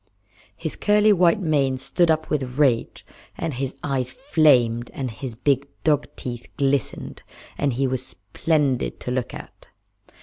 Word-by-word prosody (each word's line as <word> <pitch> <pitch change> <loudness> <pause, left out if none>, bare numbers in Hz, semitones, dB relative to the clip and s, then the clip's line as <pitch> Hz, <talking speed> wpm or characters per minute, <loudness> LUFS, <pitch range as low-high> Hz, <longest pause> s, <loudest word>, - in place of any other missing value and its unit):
His - - -4
curly 210 0 +4
white 175 -1 +4
mane 140 -6 +1
stood 170 +6 +1
up 155 0 +1
with 130 -4 -2
rage, 130 -6 +1 0.3
and 165 -3 -3
his 135 +1 -3
eyes 130 -3 -1
flamed, 130 - +3
and 130 -3 -3
his 120 +1 -6
big 140 +3 +1 0.2
dog 150 -2 +2
teeth 120 -1 -6
glistened, 140 -3 -1 0.3
and 140 -2 0
he 135 +3 0
was 130 -1 -1
splendid 130 - -1
to 125 - -4
look 125 -1 -2
at. - - -11
135 Hz, 145 wpm, -23 LUFS, 125-155 Hz, 0.3 s, curly